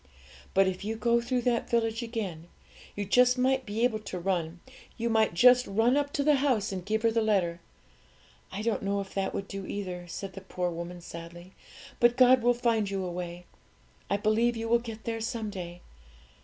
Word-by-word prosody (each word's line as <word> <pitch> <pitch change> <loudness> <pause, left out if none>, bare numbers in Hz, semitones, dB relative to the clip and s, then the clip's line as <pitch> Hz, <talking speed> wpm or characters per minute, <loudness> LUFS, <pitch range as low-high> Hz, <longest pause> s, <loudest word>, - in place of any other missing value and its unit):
But 195 0 +5
if 190 0 -3
you 220 +2 -2
go 235 +2 +2
through 245 +1 -1
that 240 -2 0
village 225 0 +1
again, 205 -9 -5 0.5
you 205 -1 -3 0.3
might 265 +1 +1 1.7
just 250 +6 +6
run 225 +6 +2
up 285 0 0
to 285 - 0
the 300 0 +4
house 250 -7 +1
and 185 -2 -4
give 215 +3 -1
her 230 - +4
the 225 0 +1
letter. 185 -6 +1 0.9
I 200 +3 -4
don't 230 -1 0
know 200 0 -1
if 195 -1 -6
that 195 -1 -1
would 195 - -4
do 195 -1 -6
either,' 180 -3 -5
said 190 +3 -6
the 195 - -8
poor 180 -2 -3
woman 170 +1 -6
sadly; 170 +2 -10 0.5
'but 240 +1 +4
God 255 0 +6
will 245 +1 +3
find 230 -4 +1
you 195 -1 -2
a 180 - -4
way. 175 0 -6 0.6
I 200 - +2
believe 225 +3 +2
you 225 0 -3
will 235 +1 +4
get 225 -2 -8
there 225 -1 -3
someday. 200 -6 -5
215 Hz, 175 wpm, -29 LUFS, 185-235 Hz, 1.7 s, just